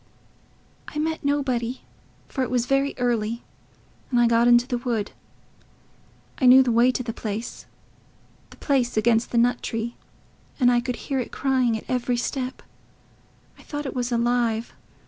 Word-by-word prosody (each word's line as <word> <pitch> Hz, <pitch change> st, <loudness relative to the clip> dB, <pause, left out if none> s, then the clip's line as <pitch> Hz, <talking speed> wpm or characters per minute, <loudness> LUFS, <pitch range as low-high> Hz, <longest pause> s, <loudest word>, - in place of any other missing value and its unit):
"I -, -, -8 dB
met 320 Hz, +1 st, -2 dB
nobody, 260 Hz, -4 st, -1 dB, 0.5 s
for 265 Hz, -, -4 dB
it 255 Hz, -, -1 dB
was 245 Hz, -1 st, +1 dB
very 275 Hz, +2 st, +1 dB
early, 235 Hz, -2 st, -1 dB, 0.7 s
and 245 Hz, -, +2 dB
I 240 Hz, -, +5 dB
got 235 Hz, 0 st, +4 dB
into 240 Hz, 0 st, +6 dB
the 250 Hz, -2 st, -2 dB
wood.... 235 Hz, -4 st, -2 dB, 1.3 s
I 260 Hz, -, +4 dB
knew 260 Hz, +1 st, +9 dB
the 250 Hz, -, 0 dB
way 235 Hz, +2 st, +4 dB
to 250 Hz, -, -3 dB
the 230 Hz, -2 st, -4 dB
place... 220 Hz, +2 st, -6 dB, 0.8 s
the -, -, -16 dB
place 255 Hz, -5 st, 0 dB
against 225 Hz, +1 st, +2 dB
the 235 Hz, -, -1 dB
nut 245 Hz, +1 st, +3 dB
tree; 230 Hz, +1 st, -4 dB, 0.6 s
and 245 Hz, -2 st, +5 dB
I 240 Hz, 0 st, +3 dB
could 250 Hz, 0 st, -3 dB
hear 270 Hz, +2 st, -3 dB
it 250 Hz, -, -4 dB
crying 255 Hz, -4 st, +1 dB
at -, -, -10 dB
every 250 Hz, -1 st, 0 dB
step.... 255 Hz, +1 st, -3 dB, 1.0 s
I -, -, -14 dB
thought 290 Hz, 0 st, -6 dB
it 270 Hz, -, -4 dB
was 245 Hz, -1 st, -2 dB
alive.... 235 Hz, -1 st, 0 dB
245 Hz, 165 wpm, -24 LUFS, 235-260 Hz, 1.3 s, knew